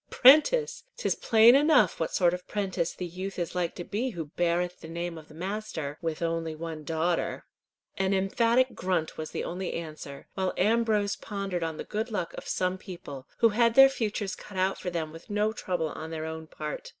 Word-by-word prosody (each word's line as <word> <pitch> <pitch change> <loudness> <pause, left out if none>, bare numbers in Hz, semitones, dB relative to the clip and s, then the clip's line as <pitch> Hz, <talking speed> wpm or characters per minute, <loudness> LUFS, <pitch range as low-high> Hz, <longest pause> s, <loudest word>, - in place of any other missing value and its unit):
"Prentice! 450 - +5
'Tis - - +1
plain 225 +1 +6
enough 280 - +4
what 160 - -1
sort 175 -2 +3
of 180 0 -6
prentice 190 -5 -1
the 180 - -4
youth 185 +3 -6
is 175 -2 -2
like 180 -2 -1
to 175 - -5
be 225 +8 -2
who 170 -8 -5
beareth 175 +1 0
the - - -10
name 170 +1 -4
of 155 -1 -11
a - - -14
master 180 -5 -4
with 165 -1 -3
one 165 - +1 0.3
only 160 -1 -6
daughter." 165 +2 -1 0.5
An 190 0 +2
emphatic 230 +6 +2
grunt 175 -3 -1
was 155 - -4
the - - -4
only 180 +1 -4
answer, 155 -4 -7
while 190 -1 -1
Ambrose 215 0 +2
pondered 195 -4 -4
on 160 -1 -3
the - - -4
good 220 +3 -3
luck 185 -6 -3
of - - -8
some 185 0 -1
people, 145 -9 -9
who 230 - +7
had 230 +2 +3
their 270 0 +9
futures 215 -6 -2
cut 200 - -10
out 190 +1 +1
for 180 - -3
them 165 -3 -3
with 165 +7 -12
no 210 +1 +1
trouble 175 -7 -2
on 160 +2 -7
their 160 -1 -4
own 160 0 -6
part. 150 -1 -6
185 Hz, 200 wpm, -28 LUFS, 165-215 Hz, 0.5 s, their